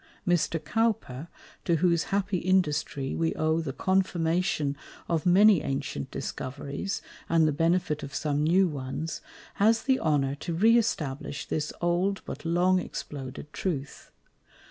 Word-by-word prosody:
Mr. 175 -1 +2
Cowper, 170 - -1 0.4
to 170 - +2
whose 170 0 +2
happy 195 -1 0
Industry 160 -7 0
we 165 0 0
owe 160 +1 +1
the 155 -4 -3
Confirmation 170 -4 0 0.3
of 165 -1 0
many 195 0 +6
ancient 135 - -3
Discoveries, 140 +8 -4 0.3
and 165 -1 +4
the - - +2
Benefit 165 0 +1
of 140 0 -7
some 145 0 0
new 180 +4 +4
ones, 150 +2 -4 0.4
has 225 +2 +4
the 265 -1 +2
Honour 140 -3 +1
to 165 +4 -4
re 220 +7 +5
establish 145 - -1
this 150 -1 -2
old, 175 +3 +1
but - - -7
long 180 +2 +3
exploded 145 -3 -7
Truth. 145 -7 -4
165 Hz, 135 wpm, -28 LUFS, 145-185 Hz, 0.4 s, many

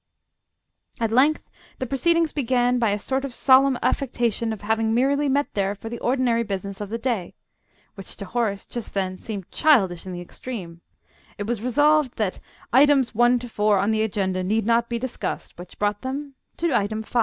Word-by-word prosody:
At 225 -1 0
length 275 +6 +3 0.3
the 260 - -3
proceedings 325 +6 +1
began 250 -2 +1
by 230 -3 +2
a 205 - 0
sort 265 +5 -2
of 270 -3 -5
solemn 265 0 +5
affectation 235 -4 0
of 220 - -6
having 220 +1 +1
merely 280 +3 +2
met 285 +2 0
there 200 0 0
for 225 +3 -8
the 235 - -6
ordinary 245 -2 +1
business 200 -2 -4
of 205 - -5
the 230 - -2
day, 230 -7 -2 0.6
which 195 -2 -9
to 200 - -6
Horace 205 -1 -2
just 240 -4 -7
then 185 -1 -2
seemed 200 -5 -7
childish 190 - +3
in - - -5
the 175 - -5
extreme; 175 -2 -8 0.6
it 205 - -4
was 230 -1 -2
resolved 290 +2 +3
that 210 -4 -1 0.3
"items 270 -1 +5
1 240 +2 +4
to 245 0 -6
4 210 -2 +2
on 200 +3 +1
the 220 0 +1
agenda 190 -4 -1
need 215 +3 0
not 235 +1 +2
be 235 - -1
discussed," 250 +1 -5
which 180 0 -11
brought 205 0 -1
them 275 +2 -5 0.2
to 335 -3 0
item 215 +2 0
5. 240 - -1
230 Hz, 190 wpm, -23 LUFS, 205-260 Hz, 0.6 s, solemn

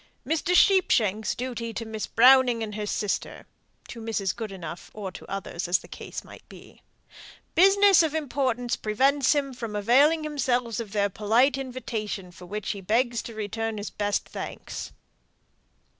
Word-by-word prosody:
"Mr. 330 +3 +1
Sheepshanks' 220 - +3
duty 235 -2 -4
to 230 - -4
Miss 220 -1 -5
Browning 250 -1 +5
and 210 -1 -5
her 210 0 -4
sister" 205 -1 -3 0.4
(to 230 - -9
Mrs. 215 -4 -2
Goodenough, 185 -7 -7
or 200 -3 -5
to - - -11
others, 190 -3 -4
as 175 +1 +3
the - - -14
case - - -8
might - - -13
be). - - -15 0.7
"Business 390 +1 +6
of 320 -2 0
importance 255 -5 -1
prevents 265 +6 +2
him 280 -2 -1
from 230 -4 -6
availing 275 +10 +4
himself 250 -6 -1
of 220 -4 -5
their 205 -1 +1
polite 225 +7 +2
invitation; 230 -8 -5
for 180 +1 -13
which 210 +2 -3
he 200 - -6
begs 235 +4 +1
to 230 - -9
return 220 +1 -3
his 205 0 -5
best 205 0 -1
thanks." - - -7
230 Hz, 155 wpm, -26 LUFS, 210-265 Hz, 0.7 s, Business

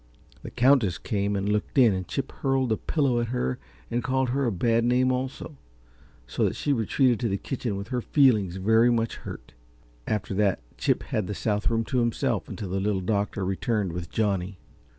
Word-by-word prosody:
The - - -7
Countess 125 - +3
came 100 -1 -1
and 100 0 -1
looked 105 +6 -1
in, 120 -6 +6
and 95 -1 -4
Chip 135 - -3
hurled 135 -3 0
a 110 - +2
pillow 135 -6 0
at 120 - -1
her 90 - -2 0.3
and 120 0 -1
called 130 -1 0
her 135 +1 0
a - - +1
bad 115 +4 +1
name 125 +2 +3
also, 130 +3 -4 0.7
so - - -2
that - - +1
she 145 - 0
retreated 120 0 +2
to 115 -2 -1
the 100 - 0
kitchen 120 -3 -4
with 100 - -6
her 125 -2 -1
feelings 110 - +3
very 110 +5 +4
much 115 -1 0
hurt. - - -9 0.5
After 105 -2 -2
that 100 -1 +1 0.2
Chip - - 0
had 105 -4 -2
the 105 - -4
south 105 0 0
room 115 -1 +1
to 125 +3 -1
himself 120 -1 0
until 100 - -6
the 95 +2 -1
Little 100 -1 0
Doctor 100 0 -1
returned 95 -1 -1
with 85 -2 -5
Johnny. 100 -3 -1
110 Hz, 195 wpm, -26 LUFS, 100-125 Hz, 0.7 s, in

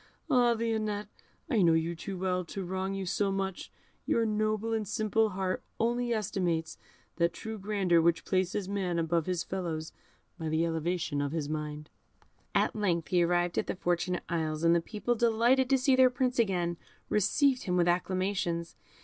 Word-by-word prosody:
Ah! 245 -3 +5
Lionette, 215 -2 -2 0.4
I 240 -9 +2
know 170 -2 +5
you 165 +1 0
too 190 +3 -6
well 180 0 0
to 195 +3 -5
wrong 190 +2 -2
you 195 -1 -3
so 200 +2 0
much; 195 -1 -3 0.4
your 230 - +2
noble 215 +1 0
and 220 -2 -1
simple 215 +1 +1
heart 185 -1 -2 0.2
only 240 +1 0
estimates 180 -7 -1 0.4
that 170 0 +2
true 220 -1 -6
grandeur 190 -4 +2
which 170 0 +2
places 185 +1 0
man 190 -3 -1
above 165 0 0
his 180 -2 -1
fellows 165 -4 -4 0.5
by 160 -1 -3
the 160 +2 +1
elevation 165 -2 -1
of 145 +1 -2
his 155 -3 -2
mind." 150 0 -5 0.6
At - - +2
length 175 -6 0
he 180 -2 +3
arrived 175 0 +1
at - - -2
the - - -2
Fortunate 175 0 -1
Isles, 160 -2 -2
and 165 0 +5
the 170 - +2
people, 215 +6 -2
delighted 240 +3 +3
to 270 - +5
see 260 0 +3
their 255 0 +6
Prince 250 0 -1
again, 175 -6 +1 0.3
received 255 +6 +2
him 180 -1 0
with 175 0 +3
acclamations. 180 -1 -1
185 Hz, 175 wpm, -30 LUFS, 170-215 Hz, 0.6 s, their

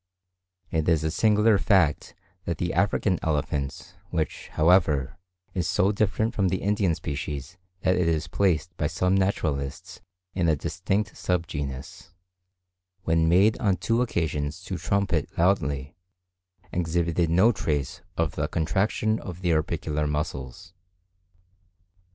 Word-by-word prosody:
It 80 0 +1
is 80 -2 +2
a 80 - 0
singular 105 +2 +4
fact 90 -8 +2 0.3
that 85 -2 -2
the 85 +2 -2
African 95 0 +1
elephant, 75 -3 -2
which, 80 -4 -3
however, 80 -3 +3 0.3
is 90 -1 -1
so 95 +1 +3
different 110 +2 0
from 100 -2 +1
the 95 +1 -1
Indian 100 -4 +1
species 75 0 -5 0.2
that 90 - +2
it 90 -2 +2
is 80 -1 0
placed 85 0 0
by 75 - 0
some 90 +3 0
naturalists 80 -8 -1 0.3
in 85 -3 +1
a 80 - +4
distinct 95 +8 -2
sub 90 -2 -1
genus, 70 +5 -6 0.9
when 80 -1 +2
made 100 +6 +4
on 100 -3 +2
two 115 +1 +1
occasions 75 -10 -2
to - - -4
trumpet 100 -6 0
loudly, 70 -7 +1 0.8
exhibited 85 -1 0
no 95 +8 +5
trace 75 - -2 0.2
of 85 -3 +1
the - - -1
contraction 105 +6 0
of 90 -1 -8
the 85 -2 +2
orbicular 75 -1 -1
muscles. 75 +1 -4
85 Hz, 130 wpm, -26 LUFS, 75-95 Hz, 0.9 s, no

